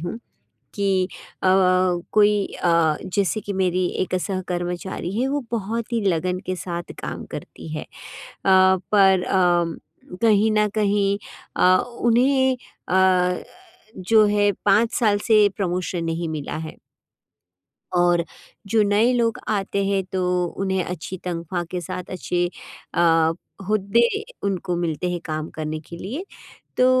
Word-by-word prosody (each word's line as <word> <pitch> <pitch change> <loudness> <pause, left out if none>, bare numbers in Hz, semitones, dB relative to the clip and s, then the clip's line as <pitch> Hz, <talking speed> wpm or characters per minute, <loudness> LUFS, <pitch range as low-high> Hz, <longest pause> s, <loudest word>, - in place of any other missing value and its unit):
हूँ 175 +7 -5 0.6
कि 195 -2 +1 0.4
अ, - - +3 0.6
कोई 210 -1 +4 0.2
अ, 165 -3 +3 0.2
जैसे 200 0 +1
कि 205 0 -5
मेरी 185 -1 +1 0.2
एक 185 - -3
सह 190 0 -2
कर्मचारी 175 +1 -3
है 265 - +1
वो 285 +1 0
बहुत 230 +1 -3
ही 230 - +1
लगन 180 +1 0
के 185 - -2
साथ 175 -1 -5
काम - - -5
करती - - -8
है। - - -4
अ, - - -22 0.6
पर 190 0 +4
अम, 175 -3 +2 0.5
कहीं 220 -1 +4
न 210 0 +3
कहीं 200 -1 +1 0.4
अ, 185 0 +5
उन्हें 255 +2 +2 0.3
अ, 180 -1 +3 0.5
जो 215 +4 +4
है 205 0 +3 0.2
5 215 +4 +4
साल 210 -4 +2
से 215 -2 +6
प्रमोशन 180 -2 -2
नहीं 165 0 -2
मिला 155 -3 -4
है। - - -11 1.2
और 175 -1 +3 0.4
जो 220 +2 +3
नए 210 +4 +3
लोग 230 -2 +1
आते 200 -1 -1
हैं 195 -1 +1
तो 185 -1 -1 0.3
उन्हें 190 -2 0
अच्छी 180 +1 -6
तनख्वाह 175 0 -3
के 180 - -3
साथ 180 +1 -6
अच्छे 175 -1 -1 0.5
अ, 165 -1 +3 0.3
हुद्दे 215 +3 +3 0.4
उनको 190 -2 -1
मिलते 170 +1 -2
हैं 175 - -2
काम 155 0 -3
करने 155 0 -4
के 170 - -9
लिए। 265 - -5 0.5
तो 255 - +4
190 Hz, 140 wpm, -22 LUFS, 175-210 Hz, 1.2 s, से